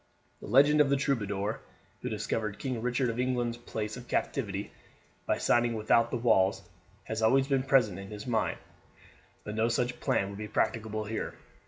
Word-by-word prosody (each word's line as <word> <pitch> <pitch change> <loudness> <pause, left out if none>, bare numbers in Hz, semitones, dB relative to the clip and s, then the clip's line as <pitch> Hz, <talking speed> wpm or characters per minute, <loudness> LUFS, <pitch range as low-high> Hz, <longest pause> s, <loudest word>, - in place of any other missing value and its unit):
The - - -9
legend 145 +6 +6
of 145 - +3
the 140 - +4
troubadour 105 -6 -1 0.4
who - - -3
discovered 105 -2 -2
King 130 -4 -3
Richard 125 +2 0
of 115 +1 -3
England's 120 -2 0
place 110 -3 -5
of 125 -1 -10
captivity 100 -6 -2 0.6
by - - +2
singing 120 -1 +2
without 115 +2 +3
the 125 - -1
walls 100 -5 +3 0.4
had 110 +2 -4
always 135 +4 +4
been 135 -2 +2
present 130 -8 +3
in 95 - -8
his 105 -1 -7
mind, 115 -3 0 0.9
but 105 - -5
no 110 +2 +1
such 125 +1 -1
plan 100 - +1
would 100 0 -8
be 105 - -4
practicable 110 0 -1
here. 110 +1 -4
115 Hz, 175 wpm, -30 LUFS, 105-125 Hz, 0.9 s, legend